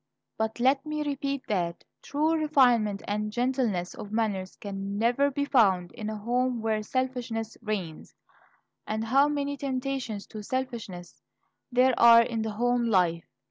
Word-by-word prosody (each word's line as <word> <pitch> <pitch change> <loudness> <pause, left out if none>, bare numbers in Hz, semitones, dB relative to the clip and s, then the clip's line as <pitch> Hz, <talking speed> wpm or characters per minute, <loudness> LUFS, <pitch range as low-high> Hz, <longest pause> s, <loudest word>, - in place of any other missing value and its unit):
But 220 +1 -2
let 265 +2 +3
me 305 0 -3
repeat 280 -1 -3
that 175 -6 -2 0.2
"true 305 +3 0
refinement 250 -10 +3
and 210 +1 -2
gentleness 240 -7 -1
of 205 - -9
manners 205 -4 -1
can 200 0 -5
never 240 +6 +2
be 285 +1 -2
found 195 -10 +3
in 215 -1 -6
a 215 - -4
home 245 +3 0
where 220 -1 0
selfishness 240 -2 -3
reigns." 190 -7 -5 0.7
And 220 +1 -2
how 270 +5 +4
many 285 -1 -2
temptations 260 -5 -3
to 215 - -6
selfishness 225 -7 -5 0.5
there 250 +1 +4
are 235 0 +8
in 230 -1 -3
the 220 - -2
home 245 +2 +1
life! 180 -6 +2
230 Hz, 145 wpm, -27 LUFS, 210-260 Hz, 0.7 s, are